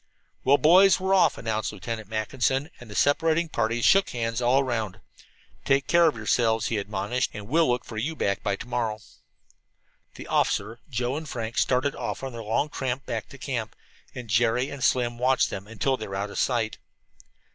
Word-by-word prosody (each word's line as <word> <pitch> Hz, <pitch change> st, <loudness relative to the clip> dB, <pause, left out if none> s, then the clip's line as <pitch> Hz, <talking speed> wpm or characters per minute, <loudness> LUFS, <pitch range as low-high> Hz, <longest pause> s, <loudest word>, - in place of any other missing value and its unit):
"Well, 140 Hz, +2 st, +5 dB
boys; 180 Hz, +8 st, +6 dB
we're 190 Hz, +1 st, 0 dB
off," 190 Hz, -, +4 dB
announced 110 Hz, -2 st, -2 dB
Lieutenant 110 Hz, +1 st, -6 dB
Mackinson, 130 Hz, +7 st, -1 dB
and 120 Hz, -, -12 dB
the 105 Hz, -, -9 dB
separating 165 Hz, +5 st, +2 dB
parties 115 Hz, -3 st, 0 dB
shook 195 Hz, 0 st, +5 dB
hands 115 Hz, 0 st, -2 dB
all 125 Hz, +3 st, +4 dB
around. 115 Hz, -7 st, -2 dB, 0.6 s
"Take 135 Hz, 0 st, +2 dB
care 170 Hz, -1 st, +5 dB
of 155 Hz, -, +1 dB
yourselves," 110 Hz, 0 st, +1 dB
he 110 Hz, -, 0 dB
admonished, 100 Hz, +5 st, -2 dB
"and 105 Hz, -1 st, -7 dB
we'll 160 Hz, +3 st, +3 dB
look 125 Hz, 0 st, 0 dB
for 110 Hz, -, -8 dB
you 150 Hz, +9 st, -2 dB
back 100 Hz, -9 st, -1 dB
by 100 Hz, -1 st, 0 dB
to 110 Hz, -, -9 dB
morrow." 115 Hz, -3 st, -1 dB, 1.2 s
The -, -, -9 dB
officer, 115 Hz, +2 st, 0 dB
Joe 125 Hz, +2 st, -2 dB
and 155 Hz, -2 st, -6 dB
Frank 115 Hz, -1 st, -3 dB
started 130 Hz, +2 st, +1 dB
off -, -, -4 dB
on 135 Hz, -, -4 dB
their 115 Hz, -1 st, -7 dB
long 115 Hz, +7 st, 0 dB
tramp 130 Hz, -1 st, -3 dB
back -, -, -4 dB
to -, -, -12 dB
camp, -, -, -4 dB, 0.4 s
and 125 Hz, -2 st, -7 dB
Jerry 120 Hz, +5 st, +1 dB
and 140 Hz, -3 st, -6 dB
Slim 120 Hz, -2 st, +1 dB
watched 130 Hz, +1 st, +2 dB
them 95 Hz, +1 st, -6 dB
until 115 Hz, +5 st, -1 dB
they 110 Hz, -, -6 dB
were 95 Hz, -, -6 dB
out 100 Hz, +1 st, -3 dB
of -, -, -4 dB
sight. 115 Hz, -4 st, 0 dB
120 Hz, 190 wpm, -26 LUFS, 110-135 Hz, 1.2 s, boys